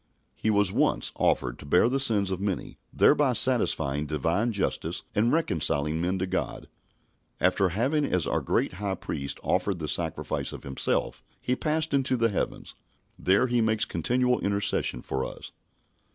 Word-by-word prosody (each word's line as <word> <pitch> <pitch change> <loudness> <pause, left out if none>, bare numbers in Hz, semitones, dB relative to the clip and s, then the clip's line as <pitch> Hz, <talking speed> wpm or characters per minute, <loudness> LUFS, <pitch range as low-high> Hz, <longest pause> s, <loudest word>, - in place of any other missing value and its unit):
He 110 - -1
was 100 -3 +3
once - - +1
offered - - 0
to - - -10
bear 90 +9 +4
the 135 +3 0
sins 105 -8 +2
of 95 0 -3
many, 100 -3 -3
thereby - - +4
satisfying 70 +2 +2
Divine 80 - 0
justice 100 - -2
and 115 +4 +2
reconciling 80 - 0
men 90 +2 0
to 95 - -1
God. 90 - -3 0.7
After 95 +1 +2
having 130 - +1
as 90 - 0
our - - 0
great - - 0
High 100 +1 -3
Priest 70 -5 -5
offered 95 +1 0
the 80 -2 -5
sacrifice 80 +1 -2
of - - -9
Himself, 65 -1 -1 0.2
He 125 - -1
passed 155 +2 0
into 135 -2 +1
the 115 -1 +2
heavens. 100 - -3 0.5
There 100 +6 +3
He 120 -1 +1
makes 110 -1 +1
continual 125 +9 0
intercession 100 -10 0
for 65 0 -2
us. - - -8
100 Hz, 160 wpm, -27 LUFS, 80-120 Hz, 0.7 s, bear